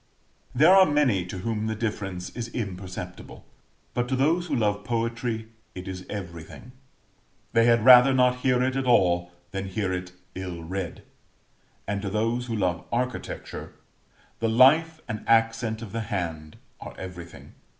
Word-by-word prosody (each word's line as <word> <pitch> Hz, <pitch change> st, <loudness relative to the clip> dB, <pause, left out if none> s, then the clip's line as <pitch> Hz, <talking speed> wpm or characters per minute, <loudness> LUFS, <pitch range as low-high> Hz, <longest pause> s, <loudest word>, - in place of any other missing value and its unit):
There 155 Hz, +8 st, +6 dB
are 190 Hz, -1 st, +7 dB
many 130 Hz, -, +2 dB
to 95 Hz, -, -6 dB
whom 110 Hz, +3 st, -2 dB
the 110 Hz, -, -2 dB
difference 100 Hz, -5 st, -4 dB
is 120 Hz, -1 st, -5 dB
imperceptible; 90 Hz, -4 st, -6 dB, 0.5 s
but 120 Hz, 0 st, -1 dB
to 130 Hz, -, 0 dB
those 165 Hz, +7 st, +1 dB
who 145 Hz, -, -1 dB
love 105 Hz, -3 st, 0 dB
poetry 115 Hz, 0 st, -2 dB, 0.3 s
it 90 Hz, +1 st, -7 dB
is 95 Hz, -1 st, -7 dB
everything 90 Hz, +3 st, -8 dB, 0.8 s
they 115 Hz, 0 st, +4 dB
had 115 Hz, -2 st, +4 dB
rather 125 Hz, +1 st, +9 dB
not 125 Hz, -1 st, +3 dB
hear 125 Hz, -1 st, +2 dB
it 130 Hz, 0 st, 0 dB
at 135 Hz, -1 st, -1 dB
all, 90 Hz, -7 st, +3 dB, 0.2 s
than 95 Hz, 0 st, -4 dB
hear 95 Hz, -1 st, -2 dB
it 90 Hz, 0 st, -4 dB, 0.2 s
ill 90 Hz, -3 st, -6 dB
read; 90 Hz, 0 st, -5 dB, 0.8 s
and 100 Hz, 0 st, -2 dB
to 100 Hz, -, -3 dB
those 115 Hz, +4 st, -1 dB
who 115 Hz, -, -2 dB
love 90 Hz, -4 st, -1 dB
Architecture, 125 Hz, +1 st, -4 dB, 0.7 s
the 115 Hz, -, 0 dB
life 155 Hz, +8 st, +5 dB
and 110 Hz, -2 st, -5 dB
accent 115 Hz, 0 st, +2 dB
of 105 Hz, -, -8 dB
the 115 Hz, -, -3 dB
hand 85 Hz, -8 st, -4 dB, 0.2 s
are -, -, -9 dB
everything. 90 Hz, -2 st, -10 dB
110 Hz, 155 wpm, -26 LUFS, 95-125 Hz, 0.8 s, rather